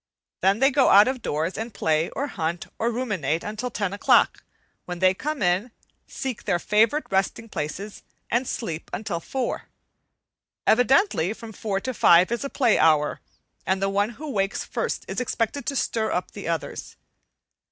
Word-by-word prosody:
Then 195 Hz, +2 st, +3 dB
they 270 Hz, +4 st, +4 dB
go 270 Hz, -1 st, +4 dB
out 205 Hz, +3 st, +8 dB
of 260 Hz, -1 st, -2 dB
doors 160 Hz, +4 st, -2 dB
and 225 Hz, -1 st, -5 dB
play, 155 Hz, +1 st, +1 dB
or 280 Hz, -, -3 dB
hunt, 170 Hz, -, -3 dB
or 230 Hz, -, +1 dB
ruminate 200 Hz, -, -1 dB
until 215 Hz, +4 st, -4 dB
ten 200 Hz, -4 st, -2 dB
o'clock, 200 Hz, -, +3 dB, 0.4 s
when 180 Hz, 0 st, -5 dB
they 185 Hz, +1 st, +4 dB
come 290 Hz, +4 st, -3 dB
in, 180 Hz, +6 st, +1 dB, 0.4 s
seek 260 Hz, -4 st, -5 dB
their 175 Hz, -, +2 dB
favorite 220 Hz, -, +2 dB
resting 195 Hz, +4 st, 0 dB
places, 195 Hz, +3 st, -5 dB, 0.3 s
and 245 Hz, +2 st, +1 dB
sleep 165 Hz, -9 st, -4 dB
until 195 Hz, -4 st, -3 dB
four. 250 Hz, +8 st, -3 dB, 1.0 s
Evidently, 245 Hz, -, +3 dB
from 225 Hz, 0 st, -10 dB
four 200 Hz, -2 st, -2 dB
to 260 Hz, -, -3 dB
five 180 Hz, -2 st, +5 dB
is 235 Hz, +3 st, -1 dB
a 275 Hz, -, -3 dB
play 245 Hz, -6 st, +2 dB
hour, 155 Hz, -2 st, +3 dB, 0.4 s
and 190 Hz, 0 st, 0 dB
the 195 Hz, 0 st, 0 dB
one 200 Hz, +2 st, +1 dB
who 305 Hz, -1 st, -6 dB
wakes 195 Hz, -3 st, -1 dB
first -, -, -3 dB
is -, -, -3 dB
expected 250 Hz, +4 st, -2 dB
to 280 Hz, -, -1 dB
stir 225 Hz, -4 st, 0 dB
up 180 Hz, -, -2 dB
the 200 Hz, -, -8 dB
others. 165 Hz, -2 st, -4 dB
210 Hz, 170 wpm, -24 LUFS, 180-245 Hz, 1.0 s, out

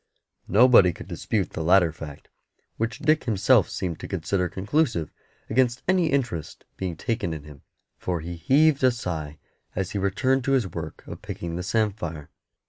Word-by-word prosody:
Nobody 105 Hz, -4 st, +6 dB
could -, -, -10 dB
dispute -, -, -2 dB
the 80 Hz, -, -4 dB
latter 90 Hz, 0 st, +5 dB
fact, 75 Hz, -2 st, -10 dB, 0.5 s
which 115 Hz, -1 st, -2 dB
Dick 155 Hz, +2 st, +2 dB
himself 110 Hz, -2 st, +3 dB
seemed 90 Hz, -4 st, -4 dB
to -, -, -7 dB
consider 90 Hz, 0 st, -1 dB
conclusive 110 Hz, -, 0 dB, 0.4 s
against 125 Hz, +1 st, +1 dB
any 185 Hz, -2 st, +3 dB
interest 120 Hz, -, -2 dB
being 90 Hz, -3 st, -4 dB
taken 100 Hz, -8 st, -2 dB
in 75 Hz, -, -8 dB
him, 75 Hz, -2 st, -13 dB, 0.4 s
for 90 Hz, -2 st, -2 dB
he 85 Hz, +2 st, -6 dB
heaved 140 Hz, -, +3 dB
a 130 Hz, -, +7 dB
sigh 80 Hz, -11 st, -4 dB, 0.4 s
as 95 Hz, -1 st, -2 dB
he 100 Hz, -, -2 dB
returned 130 Hz, +7 st, +1 dB
to 135 Hz, -, +2 dB
his 130 Hz, -5 st, +3 dB
work 95 Hz, -, -7 dB
of -, -, -9 dB
picking 85 Hz, -1 st, -5 dB
the 90 Hz, -, -3 dB
samphire. 90 Hz, -6 st, -2 dB
95 Hz, 165 wpm, -25 LUFS, 85-125 Hz, 0.5 s, a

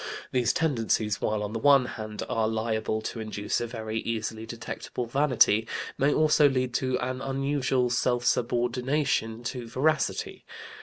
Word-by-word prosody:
These 125 Hz, -2 st, +2 dB
tendencies, 115 Hz, -8 st, 0 dB
while 105 Hz, -1 st, 0 dB
on 105 Hz, +1 st, -4 dB
the 115 Hz, -, -2 dB
one 140 Hz, +1 st, +5 dB
hand 110 Hz, -3 st, -6 dB
they -, -, -3 dB
are 115 Hz, -3 st, 0 dB
liable 110 Hz, -1 st, -1 dB
to 115 Hz, -, -5 dB
induce 110 Hz, -1 st, -2 dB
a 120 Hz, -, -2 dB
very 110 Hz, -1 st, -4 dB
easily 110 Hz, 0 st, -4 dB
detectable 120 Hz, +1 st, -5 dB
vanity, 115 Hz, -4 st, +3 dB, 0.3 s
may 140 Hz, +2 st, +2 dB
also 150 Hz, -1 st, +4 dB
lead 130 Hz, -2 st, -1 dB
to 130 Hz, -1 st, 0 dB
an 130 Hz, +1 st, -3 dB
unusual 135 Hz, -2 st, 0 dB
self 120 Hz, 0 st, +1 dB
subordination 120 Hz, 0 st, 0 dB
to 120 Hz, 0 st, -4 dB
veracity. 150 Hz, +7 st, 0 dB
120 Hz, 150 wpm, -27 LUFS, 110-130 Hz, 0.3 s, one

